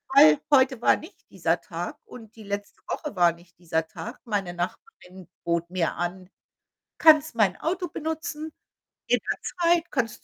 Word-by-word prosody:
weil, 155 Hz, -, +8 dB
heute 260 Hz, -2 st, +5 dB
war -, -, +5 dB
nicht 330 Hz, +6 st, -13 dB
dieser -, -, 0 dB
Tag. -, -, -6 dB
Und 230 Hz, -, -13 dB
die 220 Hz, -, -10 dB
letzte 200 Hz, 0 st, -5 dB
Woche 300 Hz, -9 st, -4 dB
war 175 Hz, -1 st, +5 dB
nicht 170 Hz, +1 st, -21 dB
dieser 160 Hz, -2 st, -1 dB
Tag. 235 Hz, +8 st, -8 dB
Meine 200 Hz, -6 st, -2 dB
Nachbarin 180 Hz, -, -7 dB, 0.2 s
bot 170 Hz, 0 st, -1 dB
mir 180 Hz, -2 st, -1 dB
an: 180 Hz, +2 st, -4 dB, 0.7 s
„Kannst 310 Hz, -3 st, +6 dB
mein 205 Hz, -5 st, +3 dB
Auto 355 Hz, +3 st, -1 dB
benutzen, 315 Hz, 0 st, -4 dB, 0.6 s
in -, -, +3 dB
der -, -, -3 dB
Zeit. 345 Hz, -1 st, +1 dB
Kannst 230 Hz, -6 st, -2 dB
215 Hz, 160 wpm, -26 LUFS, -, 0.7 s, weil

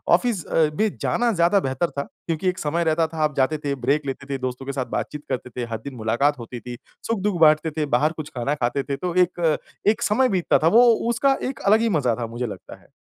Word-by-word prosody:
Office 230 Hz, -9 st, -1 dB
अ, 160 Hz, -, +2 dB
भी 215 Hz, +4 st, +2 dB
जाना 240 Hz, -1 st, +1 dB
ज़्यादा 175 Hz, +2 st, +3 dB
बेहतर 135 Hz, +3 st, -1 dB
था 140 Hz, -, -3 dB, 0.2 s
क्योंकि 165 Hz, +2 st, 0 dB
एक 185 Hz, -, -4 dB
समय 160 Hz, +3 st, 0 dB
रहता 160 Hz, 0 st, +2 dB
था 160 Hz, 0 st, -10 dB
आप 150 Hz, -2 st, 0 dB
जाते 135 Hz, +4 st, +2 dB
थे, 145 Hz, -2 st, -3 dB
ब्रेक 140 Hz, +3 st, 0 dB
लेते 135 Hz, 0 st, -5 dB
थे, 135 Hz, -, -1 dB
दोस्तों 130 Hz, 0 st, -5 dB
के 140 Hz, -, -3 dB
साथ 130 Hz, -2 st, -2 dB
बातचीत 150 Hz, -1 st, -5 dB
करते 125 Hz, -1 st, -3 dB
थे, 125 Hz, 0 st, -5 dB
हर 115 Hz, -, -1 dB
दिन 140 Hz, -2 st, -6 dB
मुलाकात 125 Hz, +6 st, +1 dB
होती 120 Hz, +1 st, -7 dB
थी, 120 Hz, 0 st, -8 dB, 0.3 s
सुख-दुःख 205 Hz, -4 st, -1 dB
बाँटते 155 Hz, +1 st, +5 dB
थे, 155 Hz, -, +1 dB
बाहर 150 Hz, +3 st, +2 dB
कुछ 155 Hz, -, -10 dB
खाना 135 Hz, +5 st, 0 dB
खाते 130 Hz, 0 st, -1 dB
थे, 140 Hz, 0 st, -3 dB
तो 180 Hz, -2 st, -3 dB
एक, 175 Hz, -3 st, +2 dB, 0.3 s
एक 220 Hz, +2 st, +3 dB
समय 255 Hz, +5 st, +2 dB
बीतता 185 Hz, -4 st, +2 dB
था -, -, +5 dB
वो 245 Hz, -, +8 dB, 0.3 s
उसका 270 Hz, +4 st, +2 dB
एक 265 Hz, -, -7 dB
अलग 215 Hz, +2 st, +6 dB
ही 230 Hz, -, +2 dB
मज़ा 125 Hz, -5 st, +1 dB
था। 120 Hz, -1 st, -4 dB
मुझे 120 Hz, +2 st, -4 dB
लगता 105 Hz, -, -10 dB
है। -, -, -23 dB
150 Hz, 245 wpm, -23 LUFS, 130-180 Hz, 0.3 s, वो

